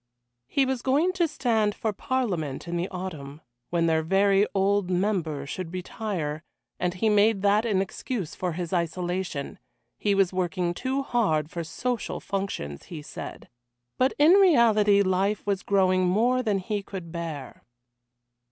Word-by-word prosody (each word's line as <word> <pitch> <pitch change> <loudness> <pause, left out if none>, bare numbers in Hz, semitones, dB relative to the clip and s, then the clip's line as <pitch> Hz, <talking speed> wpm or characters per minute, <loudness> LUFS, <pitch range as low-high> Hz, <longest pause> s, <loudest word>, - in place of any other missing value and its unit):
He 275 - +2
was 260 -2 -1
going 295 +9 +2
to 350 -3 +2
stand 230 -8 0
for 220 -2 -2
Parliament 185 - -2
in 170 - -3
the 175 +2 -1
autumn, 155 -6 -6 0.3
when 170 -1 +1
their 160 -1 +2
very 195 +4 +3
old 195 -1 +2
member 180 -6 0
should 165 +4 -5
retire, 180 -5 -4 0.4
and 180 0 -1
he 205 +4 0
made 210 -1 +3
that 205 +3 +3
an 195 -3 +2
excuse 195 -2 -5
for 180 -2 -3
his 175 +1 -4
isolation; 175 -2 -2 0.4
he 205 -1 +2
was 195 -2 +2
working 180 -1 -1
too 265 +7 -2
hard 170 - 0
for 170 - -4
social 240 +8 -3
functions, 190 - -4
he 155 -4 -8
said. - - -8 0.5
But 260 +1 +3
in 300 +3 +6
reality 230 - +5
life 195 +2 0
was 200 -2 0
growing 185 -2 +2
more 240 +7 +2
than 215 -5 +1
he 200 +2 -2
could 185 -4 -8
bear. 160 -6 -6
195 Hz, 150 wpm, -26 LUFS, 170-220 Hz, 0.5 s, in